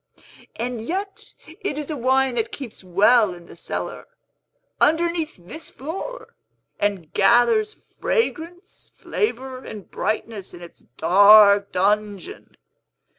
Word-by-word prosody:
And 240 Hz, -1 st, -4 dB
yet 390 Hz, -, -6 dB, 0.2 s
it 390 Hz, -9 st, -4 dB
is 300 Hz, +1 st, -5 dB
a -, -, -3 dB
wine 265 Hz, 0 st, +1 dB
that 230 Hz, -2 st, -2 dB
keeps 250 Hz, -8 st, -9 dB
well 200 Hz, +2 st, +3 dB
in 175 Hz, -1 st, -14 dB
the -, -, -14 dB
cellar, -, -, -6 dB, 0.7 s
underneath 330 Hz, 0 st, +1 dB
this 190 Hz, -, -11 dB
floor, 385 Hz, -, -7 dB, 0.5 s
and 195 Hz, -6 st, -2 dB
gathers 245 Hz, -, +3 dB
fragrance, 355 Hz, -6 st, -4 dB
flavor, 260 Hz, -, -3 dB
and 210 Hz, -3 st, -10 dB
brightness, 215 Hz, -3 st, -4 dB
in 175 Hz, -, -12 dB
its 170 Hz, -, -14 dB
dark 200 Hz, -, +5 dB
dungeon. 210 Hz, -, -2 dB
240 Hz, 115 wpm, -22 LUFS, 200-325 Hz, 0.7 s, dark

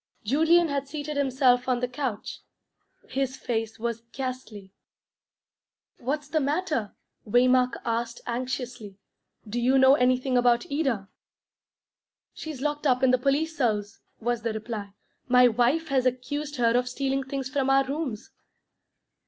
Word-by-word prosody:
Julian 320 Hz, +9 st, +4 dB
had 280 Hz, -2 st, -2 dB
seated 300 Hz, +1 st, -5 dB
himself 260 Hz, -3 st, +2 dB
on 250 Hz, -1 st, +2 dB
the 250 Hz, -, -1 dB
couch. 245 Hz, -4 st, -4 dB, 0.7 s
His 265 Hz, 0 st, -2 dB
face 225 Hz, -2 st, -3 dB
was 230 Hz, 0 st, -3 dB
ghastly. 250 Hz, -7 st, -6 dB, 1.3 s
"What's 280 Hz, +3 st, -3 dB
the 310 Hz, +1 st, 0 dB
matter?" 295 Hz, -, -1 dB, 0.3 s
Waymark 250 Hz, +2 st, +4 dB
asked 235 Hz, 0 st, -2 dB
anxiously. 245 Hz, -4 st, -4 dB, 0.5 s
"Do 235 Hz, +3 st, -2 dB
you 260 Hz, +3 st, +3 dB
know 265 Hz, 0 st, +7 dB
anything 255 Hz, -1 st, +2 dB
about 240 Hz, -1 st, +3 dB
Ida?" 265 Hz, -10 st, -1 dB, 1.3 s
"She's 310 Hz, -5 st, -7 dB
locked 295 Hz, +1 st, -1 dB
up 255 Hz, 0 st, +2 dB
in 260 Hz, -, +5 dB
the 255 Hz, -, +3 dB
police 290 Hz, +5 st, 0 dB
cells," 215 Hz, -5 st, -1 dB, 0.2 s
was 240 Hz, 0 st, -1 dB
the 230 Hz, -1 st, -2 dB
reply. 215 Hz, -2 st, -6 dB, 0.3 s
"My 250 Hz, 0 st, +6 dB
wife 250 Hz, +8 st, +1 dB
has 260 Hz, -2 st, +2 dB
accused 285 Hz, +4 st, -3 dB
her 235 Hz, -2 st, +2 dB
of 250 Hz, 0 st, +1 dB
stealing 270 Hz, +1 st, -1 dB
things 270 Hz, 0 st, -4 dB
from 270 Hz, -1 st, -1 dB
our 270 Hz, 0 st, +4 dB
rooms." 270 Hz, -6 st, -4 dB
255 Hz, 135 wpm, -26 LUFS, 235-275 Hz, 1.3 s, know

